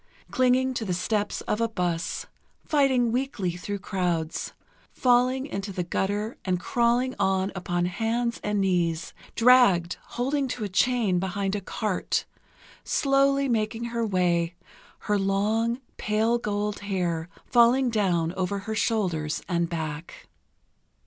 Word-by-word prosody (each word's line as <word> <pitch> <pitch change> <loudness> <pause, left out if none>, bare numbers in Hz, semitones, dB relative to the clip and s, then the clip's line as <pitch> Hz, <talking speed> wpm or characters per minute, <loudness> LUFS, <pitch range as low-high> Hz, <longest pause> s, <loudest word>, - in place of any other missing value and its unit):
Clinging 255 +1 +3
to 240 - -3
the 185 -4 -1
steps 205 +3 -1
of 210 - -2
a 230 - +1
bus, 175 -5 -2 0.4
fighting 265 -5 +3
weakly 245 -7 -1
through 200 +3 -4
crowds, 180 -5 -2 0.4
falling 255 +1 +2
into 200 -7 -4
the 180 -1 -2
gutter 205 +5 -2
and 180 -2 0
crawling 240 +6 +1
on 190 +1 +1
upon 175 -2 -1
hands 230 +5 -1
and 210 0 0
knees, 170 -4 0 0.2
dragged 230 -8 +5 0.2
holding 270 +3 0
to 250 -3 -4
a 205 - -3
chain 210 -2 +2
behind 190 +2 -2
a 205 - -3
cart, 205 +1 -2 0.6
slowly 275 0 +2
making 225 -1 -1
her 235 0 0
way, 175 -4 +1 0.5
her 205 -1 0
long, 215 +5 +1 0.2
pale 220 +3 +1
gold 210 -1 -2
hair 180 -4 -2 0.2
falling 245 +1 +4
down 175 -6 +1
over 185 +1 -1
her 220 - -3
shoulders 185 -9 0
and 170 -2 0
back. 160 -1 -5
205 Hz, 130 wpm, -26 LUFS, 180-240 Hz, 0.6 s, dragged